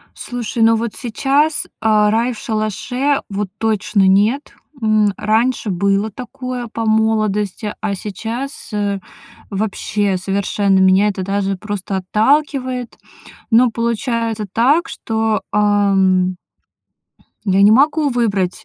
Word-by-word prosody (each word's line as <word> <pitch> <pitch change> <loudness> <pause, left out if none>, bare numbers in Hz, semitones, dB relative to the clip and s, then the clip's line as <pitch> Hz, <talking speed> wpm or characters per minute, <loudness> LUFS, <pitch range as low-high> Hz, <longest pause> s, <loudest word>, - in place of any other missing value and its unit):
Слушай, 240 -1 -4
ну 225 0 +5
вот 225 -1 -2
сейчас, 280 +5 0 0.2
а, 215 -1 +3
рай 235 +3 +1
в - - -11
шалаше, 245 +6 -1
вот 200 -1 -3
точно 215 -2 +1
нет. 210 +9 +2 0.3
М, 215 -2 +2
раньше 225 +2 0
было 200 +3 0
такое 255 0 -6
по 225 0 -4
молодости, 215 -1 0
а 205 -2 -1
сейчас, 230 +8 -6
э, 200 -1 -1 0.5
вообще, 205 -1 -1
совершенно 195 +1 0
меня 190 +2 +4
это 195 -2 -2
даже 195 0 -1
просто 205 -1 -4
отталкивает. 255 +5 0 0.5
Но 235 +1 +5
получается 230 -1 -2
так, 285 +9 +3
что, 220 -2 -1
ам 195 -3 +2 1.1
я 195 0 +3
не 205 +2 +7
могу 295 +4 +3
выбрать, 205 -7 -1
215 Hz, 115 wpm, -18 LUFS, 200-240 Hz, 1.1 s, не